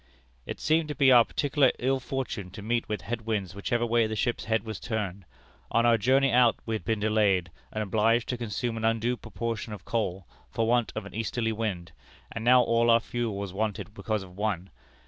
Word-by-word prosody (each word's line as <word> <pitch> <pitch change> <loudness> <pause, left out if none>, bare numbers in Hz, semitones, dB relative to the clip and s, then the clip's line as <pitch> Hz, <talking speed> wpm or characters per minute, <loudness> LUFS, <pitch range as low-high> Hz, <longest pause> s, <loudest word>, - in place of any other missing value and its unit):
"It - - -5
seemed 160 +1 +2
to 150 - -4
be 135 -2 +5
our 120 -2 +8
particular 140 +1 +2
ill 135 +2 +1
fortune 125 -7 -4
to 105 - -8
meet 120 +1 -1
with 105 -3 -2
head 120 -1 -3
winds 100 -5 -2
whichever 120 +4 -1
way 115 -1 +2
the 110 - -3
ship's 120 +2 -1
head 110 -2 +1
was 110 -3 -6
turned. 100 -5 -4 0.4
On 115 0 +2
our 115 -1 +4
journey 135 +5 +3
out 120 -1 +5
we 115 - -3
had 110 - -3
been 110 -2 -1
delayed, 105 -5 +2 0.2
and 110 - -2
obliged 110 +3 +2
to 125 - -1
consume 115 +1 -3
an 110 - -5
undue 115 +2 +1
proportion 115 -2 -5
of 100 - -10
coal, 95 -5 -2 0.2
for 115 - -1
want 120 0 +2
of 110 - -4
an 100 - -10
easterly 115 +1 -1
wind, 105 -6 -3 0.4
and 115 - -5
now 125 +1 +6
all 115 0 +2
our 115 0 +6
fuel 115 -3 -3
was 100 -2 -5
wanted 105 0 -3
because 110 -3 -2
of 90 -1 -14
one. 100 -3 -2
115 Hz, 210 wpm, -28 LUFS, 105-120 Hz, 0.4 s, our